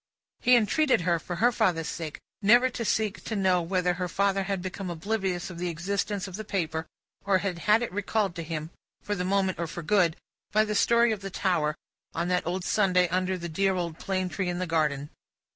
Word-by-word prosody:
He 250 Hz, -, +5 dB
entreated 255 Hz, -, +3 dB
her, 170 Hz, -1 st, +1 dB
for 175 Hz, +3 st, -5 dB
her 240 Hz, +7 st, +3 dB
father's 180 Hz, -9 st, +1 dB
sake, 160 Hz, -3 st, -5 dB, 0.2 s
never 240 Hz, +5 st, +5 dB
to 235 Hz, -, -4 dB
seek 215 Hz, -1 st, 0 dB
to 220 Hz, -, -3 dB
know 185 Hz, -3 st, +3 dB
whether 180 Hz, +1 st, +1 dB
her 180 Hz, +1 st, -3 dB
father 195 Hz, +2 st, +1 dB
had 195 Hz, -1 st, -1 dB
become 185 Hz, +1 st, -5 dB
oblivious 185 Hz, +1 st, -2 dB
of 170 Hz, -, -9 dB
the 180 Hz, 0 st, -1 dB
existence 195 Hz, +4 st, -2 dB
of 190 Hz, 0 st, -7 dB
the 215 Hz, -, -5 dB
paper, 165 Hz, -6 st, -2 dB, 0.4 s
or 195 Hz, -1 st, +3 dB
had 185 Hz, -3 st, -3 dB
had 220 Hz, +3 st, +6 dB
it 235 Hz, -, -3 dB
recalled 205 Hz, 0 st, 0 dB
to -, -, -3 dB
him 160 Hz, 0 st, -5 dB, 0.3 s
(for 205 Hz, -, -2 dB
the 180 Hz, -3 st, -2 dB
moment, 190 Hz, -1 st, +1 dB
or 170 Hz, -, -1 dB
for 170 Hz, +2 st, -6 dB
good), 175 Hz, -1 st, +3 dB, 0.3 s
by 215 Hz, +1 st, +4 dB
the 210 Hz, -, -2 dB
story 235 Hz, +2 st, +4 dB
of 215 Hz, -2 st, -3 dB
the 195 Hz, -, -5 dB
Tower, 175 Hz, -6 st, 0 dB, 0.4 s
on 170 Hz, +2 st, -1 dB
that 180 Hz, -2 st, 0 dB
old 180 Hz, +1 st, -2 dB
Sunday 180 Hz, -4 st, +3 dB
under 185 Hz, +1 st, 0 dB
the 170 Hz, -1 st, -5 dB
dear 190 Hz, +4 st, +1 dB
old 170 Hz, -3 st, -3 dB
plane 185 Hz, -1 st, -1 dB
tree 185 Hz, 0 st, -2 dB
in 175 Hz, -, -2 dB
the 185 Hz, -, -1 dB
garden. 150 Hz, -3 st, 0 dB
185 Hz, 215 wpm, -27 LUFS, 175-200 Hz, 0.4 s, had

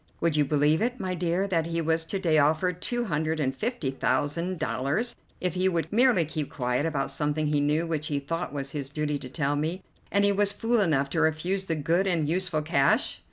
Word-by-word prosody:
Would 165 Hz, -2 st, +1 dB
you 150 Hz, -1 st, +3 dB
believe 150 Hz, +4 st, +2 dB
it, 245 Hz, +2 st, -1 dB
my 185 Hz, -1 st, -2 dB
dear, 175 Hz, +2 st, 0 dB
that 165 Hz, -4 st, 0 dB
he 170 Hz, 0 st, -2 dB
was 160 Hz, 0 st, +1 dB
to 195 Hz, -, -3 dB
day 165 Hz, -5 st, +2 dB
offered 160 Hz, +5 st, +1 dB
two 240 Hz, 0 st, -1 dB
hundred 155 Hz, -3 st, -1 dB
and 135 Hz, -3 st, 0 dB
fifty 215 Hz, -, -2 dB
thousand 170 Hz, +6 st, -1 dB
dollars 155 Hz, -, -1 dB, 0.2 s
if 180 Hz, -2 st, -1 dB
he 185 Hz, +1 st, +2 dB
would 170 Hz, +1 st, -2 dB
merely 235 Hz, -7 st, +4 dB
keep 150 Hz, -1 st, -4 dB
quiet 125 Hz, +3 st, -1 dB
about 140 Hz, -4 st, -2 dB
something 150 Hz, +2 st, -1 dB
he 150 Hz, -1 st, +1 dB
knew 150 Hz, +3 st, +1 dB
which 155 Hz, -2 st, -2 dB
he 145 Hz, -, -1 dB
thought 165 Hz, +5 st, -3 dB
was 140 Hz, -1 st, -4 dB
his 140 Hz, -3 st, -4 dB
duty 150 Hz, 0 st, -2 dB
to 130 Hz, -2 st, -7 dB
tell 145 Hz, +1 st, -1 dB
me, 160 Hz, +6 st, -2 dB, 0.3 s
and 200 Hz, 0 st, +3 dB
he 200 Hz, -, +4 dB
was 200 Hz, 0 st, +2 dB
fool 230 Hz, +2 st, +1 dB
enough 140 Hz, -7 st, +1 dB
to 165 Hz, -, +1 dB
refuse 175 Hz, +5 st, +1 dB
the 165 Hz, -, -1 dB
good 170 Hz, +6 st, +1 dB
and 165 Hz, -5 st, +1 dB
useful 175 Hz, -2 st, 0 dB
cash?" 145 Hz, -3 st, +2 dB
160 Hz, 220 wpm, -27 LUFS, 145-185 Hz, 0.3 s, merely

